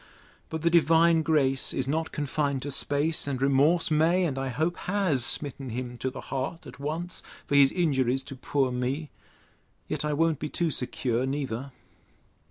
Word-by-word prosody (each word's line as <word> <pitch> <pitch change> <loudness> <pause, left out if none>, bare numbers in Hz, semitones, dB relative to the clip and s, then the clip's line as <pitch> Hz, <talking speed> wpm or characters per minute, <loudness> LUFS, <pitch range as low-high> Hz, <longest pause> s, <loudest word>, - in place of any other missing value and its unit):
But 160 -1 -4
the 170 - +3
divine 165 0 +5
grace 140 -4 +1
is 130 - -1
not 160 +3 -1
confined 140 -2 -1
to 145 - -4
space; 145 +3 0
and 135 -3 -2
remorse 140 +6 +3
may, 165 +4 +3
and 145 -6 -1
I 135 0 -2
hope 155 +8 -1
has, 180 -10 0
smitten 135 0 -1
him 125 +1 -5
to 130 - -1
the - - -8
heart 135 +5 -4
at - - -11
once, 165 +5 -3 0.2
for - - -4
his 140 -1 +6
injuries 135 -7 +1
to 135 - -8
poor 130 0 0
me! 130 +5 -2 0.8
Yet - - -2
I 150 0 0
won't 160 -1 +1
be 150 - -4
too 170 -2 0
secure 125 -1 -1
neither. 135 -2 -3
145 Hz, 175 wpm, -27 LUFS, 135-160 Hz, 0.8 s, his